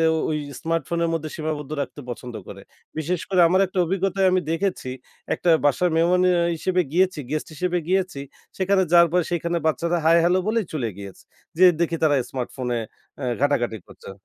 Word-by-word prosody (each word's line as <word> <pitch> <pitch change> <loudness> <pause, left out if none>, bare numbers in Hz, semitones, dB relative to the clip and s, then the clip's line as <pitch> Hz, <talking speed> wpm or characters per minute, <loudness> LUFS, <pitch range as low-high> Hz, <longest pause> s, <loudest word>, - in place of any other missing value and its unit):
অ - - 0
ঐ - - 0 0.3
স্মার্টফোনের 165 +1 -1
মধ্যে 160 -1 -3
সীমাবদ্ধ 155 -2 -4
রাখতে 145 - -6
পছন্দ 120 0 -7
করে। - - -9 0.4
বিশেষ 160 +3 -1
করে 185 -2 +4
আমার 185 +3 +3
একটা 190 0 -8
অভিজ্ঞতায় 195 +1 +1
আমি 185 0 +2
দেখেছি, 165 -6 -2 0.4
একটা 175 - -1 0.2
বাসার 175 +5 +3
মেহমান 175 +2 +3
আ - - +3 0.2
হিসেবে 185 +3 0
গিয়েছি 180 -1 +2
গেস্ট 155 +1 -2
হিসেবে 180 +2 -1
গিয়েছি। 185 -6 0 0.4
সেখানে 190 0 +2
যাওয়ার 170 -1 +6
পরে 180 -1 +3
সেখানে 170 0 -1
বাচ্চারা 170 +2 0
হাই 165 +1 +6
হেলো 180 +2 +3
বলে 225 +2 +2
চলে 135 -7 -1
গিয়েছে। 100 -2 -10 0.3
যেয়ে 185 0 +7
দেখি 170 0 +1
তারা 150 -2 +4
স্মার্টফোনে 125 -1 -3 0.4
আ - - -4 0.2
ঘাটাঘাটি 125 -6 +1
করছে। - - -11
170 Hz, 175 wpm, -23 LUFS, 150-180 Hz, 0.4 s, যেয়ে